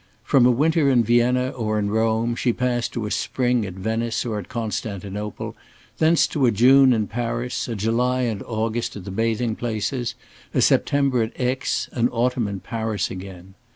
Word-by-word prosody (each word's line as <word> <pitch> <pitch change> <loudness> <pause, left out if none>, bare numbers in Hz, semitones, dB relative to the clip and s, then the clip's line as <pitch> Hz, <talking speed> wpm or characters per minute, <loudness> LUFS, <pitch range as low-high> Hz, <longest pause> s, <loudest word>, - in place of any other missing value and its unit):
From 130 -1 +4
a - - +5
winter 150 +3 +2
in 125 -3 +4
Vienna 120 +2 +2
or 110 -4 -2
in 100 -1 -1
Rome 115 +1 +1
she 120 0 +1
passed 120 -1 -1
to 115 -3 -3
a 105 - -4
spring 125 0 0
at 90 - -8
Venice 115 +4 -2
or 110 -3 -2
at 95 - -9
Constantinople, 105 -2 -4 0.4
thence 160 +1 +4
to 135 -4 +1
a - - +4
June 130 +5 +6
in 110 -3 +2
Paris, 120 +3 -3
a 115 - -3
July 120 +5 +1
and 115 -5 -1
August 115 +1 -2
at 100 -3 -8
the 100 - -6
bathing 115 +2 0
places, 120 +2 -3 0.4
a - - +3
September 140 -4 +2
at 110 +1 -4
Aix, 125 0 -1
an 120 0 +1
autumn 120 -1 0
in 100 -2 -5
Paris 110 -2 -2
again. 95 0 -9
115 Hz, 180 wpm, -23 LUFS, 110-125 Hz, 0.4 s, June